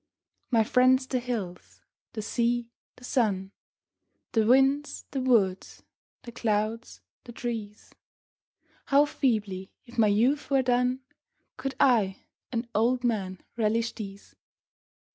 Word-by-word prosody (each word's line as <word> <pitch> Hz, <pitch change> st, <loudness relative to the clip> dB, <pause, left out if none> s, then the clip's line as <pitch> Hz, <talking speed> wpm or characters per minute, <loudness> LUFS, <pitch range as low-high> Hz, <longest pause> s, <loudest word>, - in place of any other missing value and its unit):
My 230 Hz, -3 st, +4 dB
friends 255 Hz, +3 st, +4 dB
the 260 Hz, -1 st, -1 dB
hills, 220 Hz, -8 st, -6 dB, 0.3 s
the 215 Hz, -, -4 dB
sea, 235 Hz, +1 st, 0 dB, 0.2 s
the 250 Hz, -, -18 dB
sun, 200 Hz, -7 st, 0 dB, 0.8 s
The 220 Hz, -2 st, +2 dB
winds, 270 Hz, +4 st, +3 dB
the 270 Hz, -, -2 dB
woods, 210 Hz, -8 st, +1 dB, 0.4 s
the 240 Hz, -, -9 dB
clouds, 225 Hz, 0 st, -2 dB, 0.2 s
the 240 Hz, -, -10 dB
trees 225 Hz, -3 st, -6 dB, 0.9 s
How 285 Hz, +1 st, +5 dB
feebly, 210 Hz, -10 st, -1 dB, 0.2 s
if 240 Hz, 0 st, -8 dB
my 220 Hz, -, +6 dB
youth 240 Hz, +8 st, +2 dB
were 270 Hz, -2 st, +3 dB
done, 250 Hz, +1 st, +1 dB, 0.5 s
Could 270 Hz, +1 st, -4 dB
I, 215 Hz, -7 st, +3 dB, 0.3 s
an 235 Hz, -1 st, -2 dB
old 245 Hz, +4 st, +2 dB
man, 195 Hz, -6 st, -1 dB
relish 230 Hz, 0 st, 0 dB
these 200 Hz, -2 st, -9 dB
235 Hz, 120 wpm, -27 LUFS, 210-255 Hz, 0.9 s, my